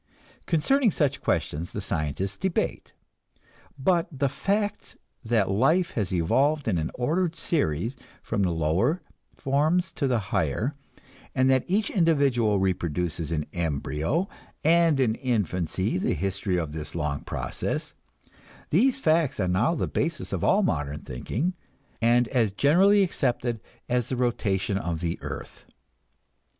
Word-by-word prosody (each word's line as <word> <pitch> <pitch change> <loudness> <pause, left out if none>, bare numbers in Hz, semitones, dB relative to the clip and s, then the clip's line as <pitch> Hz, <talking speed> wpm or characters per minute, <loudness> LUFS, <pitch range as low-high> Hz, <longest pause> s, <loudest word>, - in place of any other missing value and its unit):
Concerning 225 - +3
such 145 -6 0
questions 80 +4 -1
the - - -3
scientists 95 +1 -2
debate. 190 -2 -2 0.9
But 170 +4 +2
the 140 -1 0
fact 205 +8 -2 0.3
that 110 -4 +1
life 160 - +3
has 105 -6 -2
evolved 135 - +2
in 90 -6 +1
an 80 - -2
ordered 165 +7 0
series 120 - -1 0.3
from 110 -3 -1
the 95 - +2
lower 85 - +1 0.3
forms 155 +6 +1
to 140 - -1
the 125 -2 +2 0.2
higher, 105 - 0 0.6
and 130 +1 +4
that 130 -1 +2
each 205 +4 +1
individual 140 - +3
reproduces 85 -3 -1
in 75 -2 -1
embryo 80 - -1 0.4
and 165 -2 +4
in 120 -4 +3
infancy 100 - -1
the - - 0
history 95 -1 -1
of 80 -4 -2
this 75 +1 -6
long 75 -3 -2
process - - -3 0.8
these 250 - +4
facts 155 - +2
are 95 - +1
now 110 - +2
the - - 0
basis 165 +1 -2
of - - -2
all 205 +2 +4
modern 75 - -1
thinking, 120 - -3 0.5
and 120 +1 +4
as 115 -6 +2
generally 185 - +4
accepted 120 - -1 0.3
as 125 -2 0
the 130 - -1
rotation 100 -6 0
of 85 -4 -3
the 85 0 -3
earth. - - -7
120 Hz, 135 wpm, -26 LUFS, -, 0.9 s, and